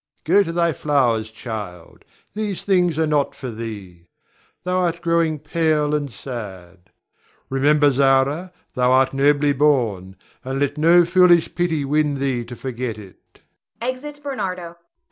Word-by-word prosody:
Go 190 +6 +4
to 165 - -2
thy 170 -1 +1
flowers, 120 -8 +1
child. 105 -7 -8 0.3
These 210 -3 -4
things 180 -5 +2
are 160 - +2
not 150 -2 0
for 130 -3 -6
thee, 100 -6 -8 0.6
thou 180 +1 0
art 175 -2 0
growing 165 -2 +1
pale 155 -1 0
and 145 -3 -2
sad. 95 -8 -9 0.6
Remember, 145 +2 +3
Zara, 140 +6 +2 0.2
thou 125 -1 +2
art 130 0 +3
nobly 145 +1 +3
born, 120 -10 +1 0.3
and 135 +1 -3
let 145 0 0
no 170 +3 +5
foolish 175 -1 +4
pity 165 -5 -1
win 150 +1 +1
thee 135 -3 -1
to 120 +1 -9
forget 125 -3 -5
it. 100 -3 -16 0.4
[Exit 260 +5 -5
Bernardo. 185 -11 -5
145 Hz, 140 wpm, -21 LUFS, 125-170 Hz, 0.6 s, no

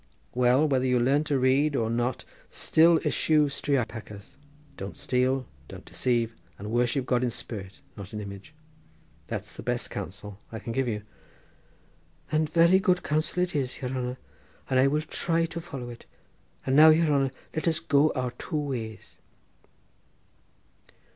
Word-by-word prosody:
Well, 125 +4 +4
whether 130 -3 +1
you 125 -1 +3
learn 140 +5 +2
to 145 -2 +1
read 135 +3 +3
or 115 -4 +1
not 120 +2 -1 0.2
still 165 +1 +4
eschew 150 -2 +3
striopachas, 120 -4 -3 0.4
don't 95 -4 -7
steal, 130 +1 +1 0.2
don't - - -11
deceive, 120 -2 0 0.2
and 105 +2 -6
worship 120 +2 +1
God 125 -1 +1
in 125 - +1
spirit, 100 0 -6
not 100 -2 -9
in 105 - -5
image. 100 +8 -9 0.7
That's - - -5
the - - -9
best - - -2
counsel 100 +3 -7
I 110 - -5
can 115 +1 -5
give 135 0 0
you." 105 -3 -2 1.3
"And 155 0 +1
very 170 +4 +5
good 180 -2 +2
counsel 155 +4 0
it 180 -3 -3
is, 130 -3 -1
yere 125 - -2
hanner, 125 -1 -3 0.5
and 130 - +4
I 135 - +5
will 150 +2 +1
try 165 +1 0
to 170 +1 -6
follow 135 -7 -7
it, 120 - -13 0.6
and 130 - +1
now, 155 +2 +9
yere 160 +1 +5
hanner, 140 -3 +2 0.2
let 155 - -1
us 165 0 +2
go 145 +1 +3
our 125 -2 -1
two 155 +6 -5
ways." 125 -7 -5
130 Hz, 160 wpm, -27 LUFS, 120-150 Hz, 1.3 s, now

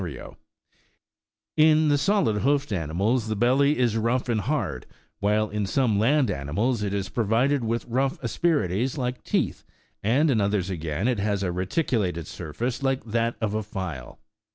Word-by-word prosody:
89 75 -7 -8 1.2
In 155 0 +5
the 145 - +4
solid 145 - +2
hoofed 140 -3 +1
animals 100 - 0
the 110 - -1
belly 135 +7 +3
is 120 -3 +1
rough 120 +3 0
and 110 -3 +1
hard, 95 - -2 0.3
while 105 +2 +2
in 105 -1 -2
some 115 -3 +1
land 130 +1 +3
animals 100 - -1
it 100 -1 -1
is 100 -1 -2
provided 120 +6 +1
with 115 +1 -1
rough 130 +3 -1
asperi 145 - +1
ties 125 - -1
like 125 -1 -3
teeth,90 - - -1 0.4
and 135 +9 +3
in 110 -5 +2
others, 100 -2 0
again, 80 +3 -2
it 125 -5 +1
has 100 -1 0
a 90 - 0
reticulated 90 - -1
sur 80 -1 -8
face 120 - -3
like 135 -1 0
that 115 +1 0
of 105 -2 -1
a 110 - 0
file. 95 - -6
115 Hz, 170 wpm, -25 LUFS, 100-130 Hz, 1.2 s, In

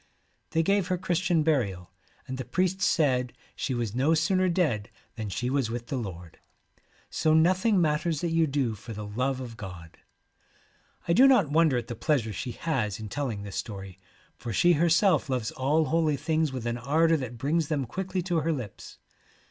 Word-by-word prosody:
They 165 - +1
gave 195 +1 +2
her 185 -1 0
Christian 175 -2 +1
burial, 100 - 0 0.4
and 130 0 -5
the - - -2
priest 185 +9 -1
said 130 -8 +2 0.2
she 130 - -2
was 115 -4 -2
no 140 +7 +2
sooner 185 +4 +2
dead 150 - 0 0.3
than 110 -3 -5
she 125 +5 -2
was 130 -3 0
with 120 0 -5
the - - -2
Lord. 90 -8 -7 0.7
So 155 0 +2
nothing 185 +5 +3
matters 155 -1 +1
that 170 - -1
you 165 -1 +3
do 135 -5 0
for 110 +2 -9
the 105 0 -6
love 130 +6 -1
of 120 -3 -8
God.' 90 -6 -10 1.1
I 170 - +3
do 260 +8 +7
not 220 - +4
wonder 155 -4 +4
at 120 - -3
the 120 - -6
pleasure 115 -2 0
she 125 +3 -5
has 115 -11 -2
in 110 -1 -7
telling 115 -5 -3
this 100 -2 -6
story, 95 -3 -6 0.4
for 120 - -6
she 175 - +4
herself 165 -1 +3
loves 125 -4 -1
all 150 +5 +1
holy 155 -1 +1
things 155 0 0
with 130 -3 -5
an 120 0 -2
ardour 160 +6 +3
that 125 -4 -6
brings 150 +5 0
them 145 -4 -1
quickly 185 +7 -3
to 175 -1 -1
her 160 +2 0
lips. 125 -10 -6
140 Hz, 190 wpm, -27 LUFS, 115-165 Hz, 1.1 s, do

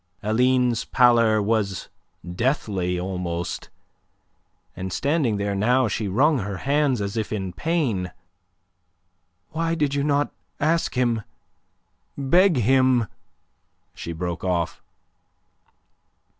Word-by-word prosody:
Aline's 125 +2 +2
pallor 115 -4 +4
was 100 -3 -1 0.4
deathly 90 -3 -1
almost, 90 -2 -4 1.1
and 95 0 -5
standing 140 - +1
there 100 0 -1
now 120 +6 +2
she 110 0 -2
wrung 135 +9 +3
her 100 -1 -4
hands 140 -4 +2
as 100 +1 -3
if 110 -2 -2
in 95 -4 -3
pain. 120 - -1 1.4
"Why 165 +1 -1
did 145 -3 0
you 140 0 0
not 145 0 +1 0.3
ask 160 +1 +1
him 120 -3 +1 1.0
beg 170 +5 +4
him..." 125 -1 +3 0.8
She 85 - -6
broke 85 0 -4
off. 90 -2 -1
115 Hz, 100 wpm, -24 LUFS, 95-140 Hz, 1.4 s, pallor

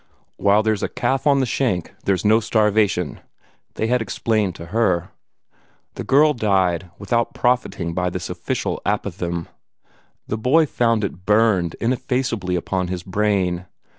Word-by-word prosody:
"While 105 +2 +3
there's 110 -2 0
a - - -1
calf 135 +2 -1
on 140 -1 +4
the - - +1
shank, 110 - -1
there's 95 0 +1
no 110 +2 +5
starvation," 105 -6 +1 0.6
they - - -1
had 125 +2 +1
explained 110 -4 -1
to 85 - -9
her. 95 -7 +1 0.8
The - - -6
girl 150 +3 +4
died 95 - +1
without 115 +4 -1
profiting 120 -9 0
by 90 +1 0
this 90 0 -5
official - - -3
apothegm. 90 -4 -2 0.8
The 110 - -3
boy 145 +8 +4
found 115 -5 +1
it 95 -2 -5
burned 105 -6 +3
ineffaceably 120 -5 -1
upon 90 +1 -1
his 90 -1 -4
brain. 95 -3 0
105 Hz, 140 wpm, -21 LUFS, 90-115 Hz, 0.8 s, no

